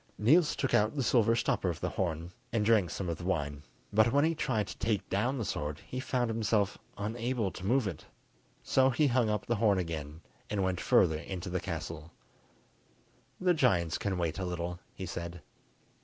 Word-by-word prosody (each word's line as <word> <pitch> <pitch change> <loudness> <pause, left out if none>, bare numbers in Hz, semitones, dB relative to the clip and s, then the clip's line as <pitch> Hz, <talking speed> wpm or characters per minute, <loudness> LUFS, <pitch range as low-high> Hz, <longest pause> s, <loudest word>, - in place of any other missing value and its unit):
Niels 150 +10 +4
took 135 - -1
out 105 +6 +3
the 135 - 0
silver 115 -1 +4
stopper 115 -5 +1
of 85 - -3
the - - -2
horn, 85 -1 -2 0.2
and 110 -2 +1
drank 105 -6 +4
some 95 - -4
of 85 -2 -3
the - - -7
wine, 75 -6 -1 0.3
but 110 +2 +5
when 145 +3 +4
he 165 - +2
tried 110 -9 0
to - - -8
take 110 -4 0
down 120 +8 0
the 115 - -2
sword 75 -4 -3
he 130 - -5
found 125 -2 0
himself 110 -3 +1 0.2
unable 115 0 -1
to - - -9
move 120 +3 +2
it. 90 -6 -6 0.6
So 130 0 +4
he 135 +4 +2
hung 125 -4 +3
up 105 -1 -1
the 120 - 0
horn 105 -2 +3
again, 80 -3 -4 0.3
and 100 -2 0
went 95 -2 -1
further 80 -1 +4
in 90 +3 -5
to 90 0 -6
the 90 - 0
castle. 80 -2 -5 1.3
"The 180 -1 +3
giants 90 - +2
can 100 -2 -1
wait 85 0 -1
a 95 - -2
little," 90 0 -3 0.2
he 95 - -5
said. 85 -1 -6
100 Hz, 200 wpm, -31 LUFS, 85-120 Hz, 1.3 s, but